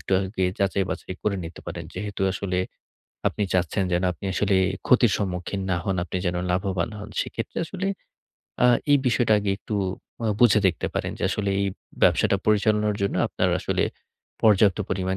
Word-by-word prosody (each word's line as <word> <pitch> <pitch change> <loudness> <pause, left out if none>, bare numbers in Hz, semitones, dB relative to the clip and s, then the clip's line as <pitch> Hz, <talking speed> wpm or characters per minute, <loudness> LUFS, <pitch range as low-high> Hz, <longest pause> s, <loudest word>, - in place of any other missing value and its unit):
একটু - - -4
আগে 95 0 -2
যাচাই-বাচাই 95 -1 -1
করে 100 -2 0
নিতে 80 +1 -8
পারেন। - - -5
যেহেতু 100 +1 -5
আসলে 95 -2 -2 0.7
আপনি 105 - -3
চাচ্ছেন 95 +2 +1
যেন 90 +1 +2
আপনি 85 - -12
আসলে 100 -1 +2 0.3
ক্ষতির 120 -4 +5
সম্মুখীন 95 0 -3
না 90 - +2
হোন, 95 -2 0
আপনি 90 - -5
যেন 90 0 0
লাভবান 95 +1 0
হোন 105 +1 -7
সেক্ষেত্রে - - -5
আসলে 190 +3 -4 0.8
আ - - +8 0.2
এই 145 - +7
বিষয়টা 120 -2 +3
আগে 100 -1 -1
একটু 105 - -5 0.5
অ - - +1
বুঝে 110 -3 +6
দেখতে 90 - 0
পারেন - - -1
যে - - -6
আসলে 100 -2 -1
এই 100 - +1 0.4
ব্যবসাটা 100 - +4
পরিচালনার 105 0 +3
জন্য 100 - 0
আপনার - - 0
আসলে - - 0 0.6
পর্যাপ্ত 105 -2 +5
পরিমাণ 95 0 -1
100 Hz, 165 wpm, -25 LUFS, 95-105 Hz, 0.8 s, আ